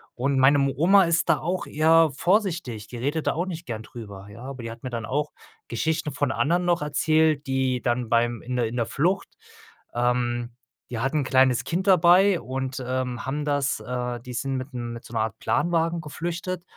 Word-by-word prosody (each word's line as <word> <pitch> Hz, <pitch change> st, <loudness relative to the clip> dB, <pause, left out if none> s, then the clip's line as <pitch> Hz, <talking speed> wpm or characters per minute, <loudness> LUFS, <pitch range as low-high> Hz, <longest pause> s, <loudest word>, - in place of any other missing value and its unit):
Und 135 Hz, +2 st, 0 dB
meine 140 Hz, +2 st, +5 dB
m 140 Hz, 0 st, +2 dB
Oma 185 Hz, +8 st, +5 dB
ist 170 Hz, 0 st, +1 dB
da 160 Hz, -4 st, +3 dB
auch 180 Hz, +5 st, -2 dB
eher 160 Hz, +1 st, +4 dB
vorsichtig, 170 Hz, -, 0 dB
die 120 Hz, -, -8 dB
redet 145 Hz, +6 st, -2 dB
da -, -, +3 dB
auch 175 Hz, +4 st, -2 dB
nicht 175 Hz, -2 st, -6 dB
gern 115 Hz, -6 st, -5 dB
drüber, 100 Hz, -4 st, -10 dB
ja, 115 Hz, +4 st, -11 dB
aber 135 Hz, -1 st, -7 dB
die 115 Hz, -, -5 dB
hat 115 Hz, +1 st, -10 dB
mir 130 Hz, -, -5 dB
dann 115 Hz, -1 st, -4 dB
auch 145 Hz, +3 st, -1 dB, 0.4 s
Geschichten 155 Hz, +6 st, -1 dB
von 130 Hz, 0 st, -1 dB
anderen 175 Hz, +6 st, +1 dB
noch 175 Hz, -3 st, +1 dB
erzählt, 155 Hz, 0 st, +2 dB
die 130 Hz, -2 st, 0 dB
dann 120 Hz, -1 st, -1 dB
beim 120 Hz, 0 st, +1 dB
in 125 Hz, +1 st, -4 dB
der 120 Hz, -2 st, +1 dB
in 115 Hz, -, -6 dB
der 120 Hz, -2 st, 0 dB
Flucht, 175 Hz, -, 0 dB, 0.7 s
ähm, 120 Hz, 0 st, 0 dB, 0.4 s
die 115 Hz, -, -3 dB
hatten 135 Hz, +6 st, 0 dB
'n -, -, -1 dB
kleines 130 Hz, -2 st, +3 dB
Kind 185 Hz, +4 st, -2 dB
dabei 185 Hz, +1 st, +5 dB
und, 130 Hz, +2 st, -4 dB
ähm, 125 Hz, -1 st, -3 dB
haben 145 Hz, +3 st, -2 dB
das, 145 Hz, -2 st, 0 dB
äh, 125 Hz, -1 st, -3 dB
die 125 Hz, +1 st, -9 dB
sind 135 Hz, +2 st, -2 dB
mit 130 Hz, +2 st, -6 dB
dem 120 Hz, -2 st, -5 dB
mit 115 Hz, -, -9 dB
so -, -, -13 dB
'ner 115 Hz, -, 0 dB
Art 110 Hz, -2 st, -3 dB
Planwagen 170 Hz, -1 st, +1 dB
geflüchtet 175 Hz, +4 st, -4 dB
135 Hz, 210 wpm, -25 LUFS, 120-165 Hz, 0.7 s, meine